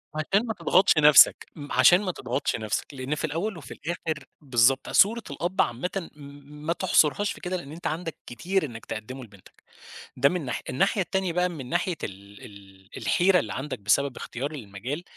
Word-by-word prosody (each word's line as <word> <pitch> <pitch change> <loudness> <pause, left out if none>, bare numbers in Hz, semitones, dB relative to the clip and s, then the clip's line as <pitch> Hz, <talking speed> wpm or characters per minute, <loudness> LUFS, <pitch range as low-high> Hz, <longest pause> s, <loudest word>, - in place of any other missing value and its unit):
عشان 195 +9 +1
ما 225 - -2
تضغطش 185 -4 +3
نفْسك، 150 -2 +7
م 145 -2 -9
عشان 180 +2 +6
ما 190 -3 -2
تضغطش 130 -4 -2
نفْسك، 110 +5 -3
لإن 135 +2 -3
في 155 - -2
الأول 170 +6 -3
وفي 140 -6 -9
الآخر 160 -3 -5 0.2
بالضبط، 130 -1 +2
صورة 225 +3 +4
الأب 175 +6 -1
عامةً 170 +9 -3
م 145 +1 -13
ما 165 - +1
تحصرهاش 185 +2 +2
في - - -10
كده 185 0 -2
لإن 145 -5 -9
أنت 165 +3 -5
عندك 165 +1 -4
كتير 180 +8 -1
إنّك 115 -5 -9
تقدّمه 130 +5 -7
لبنتك. 100 -5 -18 0.5
ده 135 +2 +4
من 180 -5 -3
ناحية، 125 - -3
الناحية 195 +7 +1
التانية 190 0 -1
بقى 180 +1 +1
من 140 -7 -8
ناحية 180 +6 0
ال 100 +1 -9
ال 95 -1 -16
الحيرة 180 +1 +3
اللي 105 -9 -4
عندك 135 0 -5
بسبب 130 +7 +1
اختيار 135 +5 -5
المجال، 125 - -6
150 Hz, 180 wpm, -26 LUFS, 125-180 Hz, 0.5 s, نفْسك